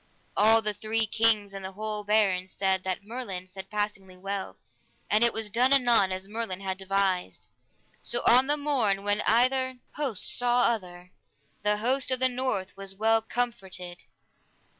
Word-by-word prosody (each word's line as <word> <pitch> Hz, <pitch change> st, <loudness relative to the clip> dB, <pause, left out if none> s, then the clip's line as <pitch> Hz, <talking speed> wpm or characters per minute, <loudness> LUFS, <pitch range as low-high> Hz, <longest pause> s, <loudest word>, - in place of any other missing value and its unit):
All 220 Hz, +2 st, +5 dB
the 210 Hz, 0 st, 0 dB
three 220 Hz, +2 st, 0 dB
kings 215 Hz, -2 st, +2 dB
and 195 Hz, -1 st, -7 dB
the 190 Hz, 0 st, -6 dB
whole 210 Hz, +1 st, -4 dB
barons 195 Hz, -3 st, +1 dB
said 190 Hz, -1 st, +1 dB
that 190 Hz, +1 st, -3 dB
Merlin 210 Hz, -5 st, -5 dB
said 190 Hz, +1 st, -9 dB
passingly 205 Hz, -3 st, -4 dB
well, 195 Hz, +1 st, -5 dB, 0.5 s
and 215 Hz, +2 st, +4 dB
it 235 Hz, -, +5 dB
was 220 Hz, -2 st, -3 dB
done 250 Hz, +4 st, +3 dB
anon 240 Hz, -8 st, +4 dB
as 185 Hz, +1 st, -4 dB
Merlin 210 Hz, -3 st, -3 dB
had 190 Hz, -1 st, -3 dB
devised. 190 Hz, -1 st, -1 dB, 0.5 s
So 240 Hz, -, -3 dB
on 250 Hz, +3 st, +6 dB
the 295 Hz, +1 st, +1 dB
morn, 245 Hz, -10 st, 0 dB
when 205 Hz, +1 st, +1 dB
either 255 Hz, +3 st, +2 dB, 0.2 s
host 265 Hz, -10 st, -1 dB
saw 245 Hz, 0 st, +3 dB
other, 180 Hz, -5 st, -2 dB, 0.5 s
the 210 Hz, 0 st, +1 dB
host 255 Hz, +5 st, +1 dB
of 255 Hz, -1 st, +1 dB
the 260 Hz, 0 st, +4 dB
north 245 Hz, -7 st, -2 dB
was 195 Hz, 0 st, -6 dB
well 225 Hz, +2 st, +3 dB
comforted. 195 Hz, -7 st, -4 dB
210 Hz, 160 wpm, -27 LUFS, 190-235 Hz, 0.5 s, on